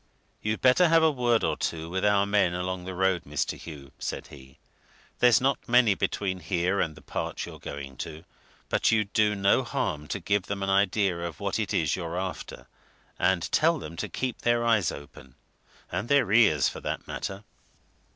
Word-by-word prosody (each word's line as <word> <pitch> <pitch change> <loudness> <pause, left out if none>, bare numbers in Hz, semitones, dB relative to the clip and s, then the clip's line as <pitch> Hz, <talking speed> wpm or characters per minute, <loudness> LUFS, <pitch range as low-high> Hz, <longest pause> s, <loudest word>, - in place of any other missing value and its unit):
"You'd 110 +1 -2
better 130 +8 +5
have 165 0 +4
a 160 - +5
word 120 -4 +1
or - - +1
two 80 -1 -3
with 95 +2 -3
our 100 -1 +3
men 100 -4 +2
along 90 0 -3
the 95 0 -6
road, 95 -2 +1
Mr. 75 0 -2
Hugh," 70 -5 -10
said - - -4
he. 65 -2 -14 0.6
"There's 125 -2 +6
not 135 -1 -1
many 120 -3 +5
between 95 -1 -2
here 90 +3 0
and 80 -2 -2
the - - -15
part - - -4
you're - - -10
going 70 -2 -8
to, 80 +5 -7 0.4
but - - +2
you'd 110 -3 +1
do 105 -1 +3
no 100 0 +3
harm 75 0 -3
to - - -3
give 100 -2 0
them 100 -1 -3
an 95 - 0
idea 95 -2 +2
of 85 -3 -5
what - - -2
it - - -2
is - - +1
you're 85 -1 -4
after, 95 0 -5 0.5
and 90 -1 +2
tell 165 +2 +3
them 85 - -8
to - - -4
keep 130 -2 -3
their 120 0 +2
eyes 110 -6 +3
open 65 -3 -12 0.6
and 115 - -3
their 140 -9 +3
ears, 105 - +5
for - - -5
that - - -4
matter." 100 +1 -5
95 Hz, 190 wpm, -27 LUFS, 85-110 Hz, 0.6 s, There's